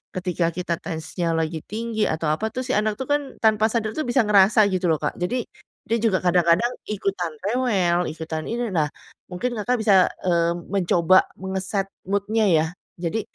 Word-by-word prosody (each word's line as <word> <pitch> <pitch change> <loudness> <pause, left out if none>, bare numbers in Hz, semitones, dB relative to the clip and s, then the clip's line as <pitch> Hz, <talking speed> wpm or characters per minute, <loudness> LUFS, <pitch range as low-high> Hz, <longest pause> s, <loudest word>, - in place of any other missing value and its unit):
Ketika 180 -2 0
kita 175 -1 -2
tensinya 165 +1 -3
lagi 160 0 -4
tinggi 220 0 -2
atau 160 0 -2
apa 210 +8 -1
tuh, 255 - -2
si 255 - -3
anak 210 0 +1
itu 265 - -3
kan 290 - +3 0.2
tanpa 220 0 +4
sadar 220 -2 -1
itu 310 - -2
bisa 245 +2 +3
ngerasa 210 +1 +5
gitu 185 -1 -1
loh, 160 - +3
Kak. - - -2
Jadi 230 +7 -1 0.4
dia 230 - +1
juga 215 -5 +2
kadang-kadang 180 +5 +3 0.2
ikutan 195 -5 -2
rewel, 195 -7 +1
ikutan 160 0 -5
ini. 235 0 -2
Nah, 155 -3 +1 0.4
mungkin 240 +8 -3
Kakak 245 +4 0
bisa, 195 -4 +5 0.2
eee, 170 -1 +2 0.2
mencoba 180 -1 +4
mengeset 190 +1 -2 0.2
mood-nya 205 +2 +1
ya. 160 -2 +4 0.4
Jadi, 180 +6 -1
190 Hz, 170 wpm, -23 LUFS, 170-220 Hz, 0.4 s, ngerasa